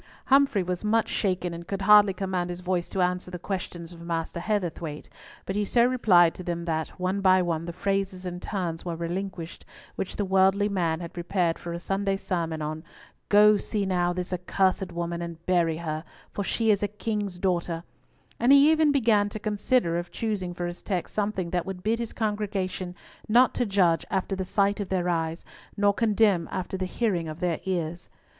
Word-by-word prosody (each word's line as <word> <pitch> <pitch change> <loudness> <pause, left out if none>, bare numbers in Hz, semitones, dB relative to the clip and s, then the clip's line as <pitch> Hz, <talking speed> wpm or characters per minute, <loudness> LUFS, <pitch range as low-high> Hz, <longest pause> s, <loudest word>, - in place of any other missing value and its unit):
Humfrey 275 -8 +4
was 180 +1 -3
much 220 +1 +2
shaken 180 -3 -1
and 170 0 -8
could 195 0 -3
hardly 205 0 +7
command 185 -2 -2
his 175 0 -5
voice 180 -1 -1
to 190 - 0
answer 180 0 -1
the 180 - -5
questions 175 -2 -5
of 170 -1 -12
Master 170 0 -3
Heatherthwayte, 170 -6 -3 0.4
but 190 - -3
he 210 - +1
so 235 +3 +3
replied 190 -10 +5
to 185 - -9
them 170 -1 -3
that, 160 -2 -1
one 185 +2 -1
by 185 -1 +5
one, 165 -2 -2
the 170 - -4
phrases 195 0 -2
and 180 0 -5
turns 175 -5 -3
were 170 -2 -3
relinquished 170 0 -5 0.3
which 190 - -4
the 205 - -1
worthy 190 +2 +3
man 175 -5 0
had 170 - -7
prepared 175 -1 0
for 170 - -6
a 170 - -3
Sunday's 195 +2 -2
sermon 165 -4 -2
on 155 +1 -4 0.5
"Go 210 +1 +7
see 205 0 -2
now 175 -2 +1
this 180 +1 -4
accursed 185 +1 0
woman 170 0 -3
and 170 -1 -7
bury 170 -3 +2
her, 155 -2 -4 0.3
for 200 - -3
she 225 +3 +1
is 205 - +2
a 205 - +1
king's 210 -3 -3
daughter," 175 -2 -1 0.6
and 240 +3 +4
he 280 +2 +7
even 315 -2 +4
began 220 -7 +3
to 210 - -6
consider 210 -4 +1
of 175 0 -6
choosing 205 -5 -3
for 175 0 -4
his 175 0 -6
text 185 -4 -3
something 200 -4 -1
that 175 0 -1
would 185 -2 -6
bid 225 +2 +1
his 235 -2 -4
congregation 200 -4 -2 0.3
not 245 +4 +5
to 245 - 0
judge 180 -5 +3
after 195 0 -1
the 190 -1 -3
sight 200 +2 +1
of 200 - -3
their 180 -2 0
eyes, 165 -1 -1 0.3
nor 205 0 +4
condemn 210 -6 +2
after 185 +1 -3
the 185 -1 -2
hearing 185 -6 -1
of 155 +1 -7
their 175 -3 0
ears. 175 -2 -3
185 Hz, 195 wpm, -26 LUFS, 170-205 Hz, 0.6 s, hardly